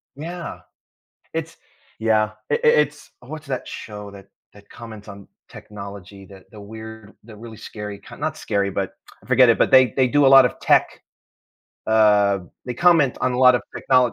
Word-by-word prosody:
Yeah. 170 +3 -7 0.8
It's - - -5 0.4
Yeah, 110 -1 +1 0.2
i - - +2
i - - +1
it's 150 -1 +1
What's 150 +4 -10
that 130 -2 -4
show 105 -2 -9
that 100 -1 -14 0.3
that 100 0 -18
comments 110 -3 -11
on 100 -1 -12 0.2
technology, 100 -1 -11
that 95 -1 -15
the 105 - -13
weird 110 +1 -11
the 110 -1 -13
really 110 0 -11
scary, 105 -2 -8
kind - - -14
not - - -3
scary, 100 -1 -2
but 95 0 -3 0.3
I - - -19
forget 130 -1 +5
it, 115 - +3
but - - +2
they 130 -4 +6
they 130 -2 +3
do 145 +2 +3
a - - +7
lot 135 - +9
of - - -6
tech, - - +3 1.0
uh, 105 -3 +3 0.3
they 125 - -4
comment 165 -3 +3
on 125 - 0
a 125 - -3
lot 125 -1 +6
of 120 - -1
technol 125 -2 +2
110 Hz, 185 wpm, -21 LUFS, 100-130 Hz, 1.0 s, lot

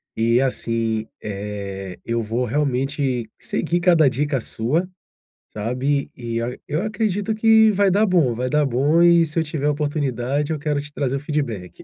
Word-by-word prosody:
E, 115 +2 +2
assim, 115 -4 0 0.2
eh, 100 -2 -5
eu 115 0 -1
vou 115 +3 -1
realmente 135 -1 -1
seguir 175 +1 -1
cada 170 -4 +5
dica 140 +2 0
sua, 135 +11 -1 0.6
sabe? 125 +6 -1
E 115 -1 -3
a 120 +2 -4
eu 150 +3 -1
acredito 215 0 -1
que 220 0 +5
vai 200 -1 +2
dar 210 +3 +3
bom, 165 -10 +3
vai 125 +2 -2
dar 150 +1 +2
bom. 140 +6 +3
E, 170 -1 +5
se 155 +2 -7
eu 165 - +3
tiver 150 -2 -2
a - - +3
oportunidade, 145 -1 -1
eu 155 - -1
quero 145 -1 -1
te 145 +1 -11
trazer 140 -2 -1
o - - -4
feedback. 140 - -4
140 Hz, 170 wpm, -22 LUFS, 115-160 Hz, 0.6 s, cada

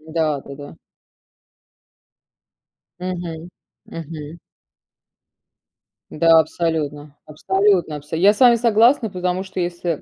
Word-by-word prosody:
Да-да-да. 145 -3 -3 2.2
Мгм. 175 -2 -6 0.4
Мгм. 160 0 -9 1.7
Да, 165 +1 +4
абсолютно 150 -3 -3
абсолютно 190 +1 0
абса 150 +2 -7
Я 195 +5 +4
с - - -12
вами 245 -2 +6
согласна, 230 +1 +3
потому 180 0 -2
что 190 -1 -7
если 175 -2 -3
170 Hz, 85 wpm, -20 LUFS, 155-190 Hz, 2.2 s, вами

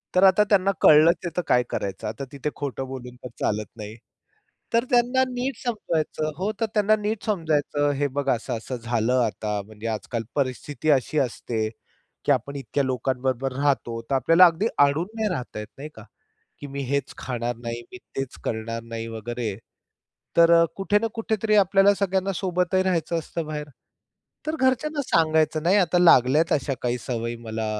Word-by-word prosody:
तर 185 - +5
आता 195 +2 +6
त्यांना 195 -1 +4
कळलंच 155 +3 +7
आहे - - -1
तर - - +3
काय 125 0 +4
करायचं? 100 -1 -4
आता 140 - -5
तिथे 140 +1 -3
खोटं 135 -2 -4
बोलून 125 -2 -8
तर - - -5
चालत 105 0 -1
नाही. 105 0 -7 0.8
तर 230 0 +4
त्यांना 245 +2 +3
नीट 255 +2 -3
समजवायचं 165 -10 -2
हो, 195 +4 -1
तर 225 - +2
त्यांना 215 0 +4
नीट 210 +1 -2
समजवायचं. 155 -7 0
हे 145 +1 +1
बघा 140 -1 +2
असं-असं 120 +2 -4
झालं 120 +2 +1
आता 105 -1 -3
म्हणजे 110 +1 -8
आजकाल 115 +1 -3
परिस्थिती 140 +3 -2
अशी 135 +2 +1
असते 115 -3 -2 0.6
की - - +3
आपण 140 +1 0
इतक्या 140 +1 -2
लोकांबरोबर 130 0 -1
राहतो. 135 -4 0
तर 125 +4 -2
आपल्याला 165 +7 +6
अगदी 175 +5 +2 0.2
अडून 155 +5 -1
नाही 220 -1 0
राहता 125 -7 -5
येत, 105 - -6
नाही 150 +3 -7
का? 110 - -11 0.6
की 145 - -7
मी 140 - -3
हेच 140 -1 -1
खाणार 120 -1 -3
नाही. 115 0 -4
मी 185 - -8 0.2
तेच 135 -1 -4
करणार 115 +1 -3
नाही, 115 0 -6
वगैरे. 115 -1 -4 0.8
तर 170 0 +7
अ, - - +5
कुठे 195 +1 +1
ना 225 - 0
कुठेतरी 220 -1 0
आपल्याला 195 0 +5
सगळ्यांना 195 0 0
सोबतही 180 +1 0
राहायचं 170 -2 0
असतं 165 +1 -5
बाहेर. 150 -1 -5 0.8
तर 310 - 0
घरच्यांना 285 +3 +1
सांगायचं, 160 - +2
नाही 180 +4 +4
आता 180 -2 +3
लागल्यात 155 -2 +5
अशा 140 -1 0
काही 125 0 0
सवयी 115 0 -3
मला 110 -1 -3
145 Hz, 170 wpm, -24 LUFS, 120-185 Hz, 0.8 s, कळलंच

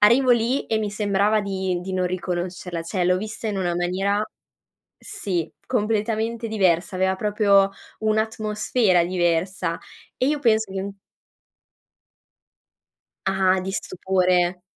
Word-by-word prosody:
arrivo 245 +5 +5
lì 240 +3 +2
e 220 - +1
mi 210 -2 -2
sembrava 210 0 +2
di 190 -3 -2
di 190 +1 -6
non 185 -1 +1
riconoscerla, 180 -1 -3
cioè 180 +2 -1
l'ho 180 +1 +3
vista 215 +3 -5
in 200 - -2
una 175 -2 0
maniera 190 +4 0 0.8
sì, 190 - -3 0.2
completamente 225 0 -1
diversa, 185 -4 +1
aveva 190 0 +2
proprio 200 -1 +3 0.3
un'atmosfera 215 -3 +1
diversa 175 0 0 0.4
e 255 - +1
io 295 +1 +1
penso 220 -5 +2
che 190 - -2
n 200 0 -6 2.3
Ah-ah. 190 -1 +3
Di 190 - -3
stupore. 180 -1 +1
195 Hz, 120 wpm, -23 LUFS, 180-215 Hz, 2.3 s, arrivo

